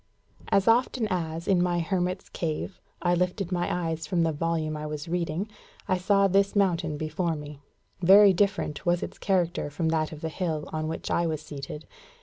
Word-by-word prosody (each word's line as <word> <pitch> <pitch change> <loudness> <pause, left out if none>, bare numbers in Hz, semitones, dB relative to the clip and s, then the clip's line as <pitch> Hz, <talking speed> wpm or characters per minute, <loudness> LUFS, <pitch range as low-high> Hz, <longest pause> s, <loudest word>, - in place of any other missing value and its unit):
As 195 +1 +2
often 235 0 +3
as, 165 -2 -2
in 185 -3 +4
my 175 -1 +1
hermit's 180 +2 -1
cave, 165 +3 -4 0.2
I 175 0 +3
lifted 180 +1 -1
my 175 -1 0
eyes 165 -2 -2
from 170 0 +1
the 165 - +2
volume 160 0 -1
I 150 0 -4
was 150 0 -5
reading, 170 +2 -2 0.4
I 185 -1 +1
saw 195 +1 +3
this 195 +2 +2
mountain 175 -6 +1
before 160 +2 -1
me. 150 -1 -8 0.4
Very 195 +2 +8
different 195 -5 0
was 175 0 +1
its - - -7
character 175 -6 0
from 160 +2 -1
that 155 -1 0
of 155 -1 -9
the 160 - -2
hill 160 -3 -3
on 155 0 -2
which 160 - -4
I 170 0 +2
was 155 -1 -3
seated. 145 +1 -7
170 Hz, 185 wpm, -27 LUFS, 155-185 Hz, 0.4 s, Very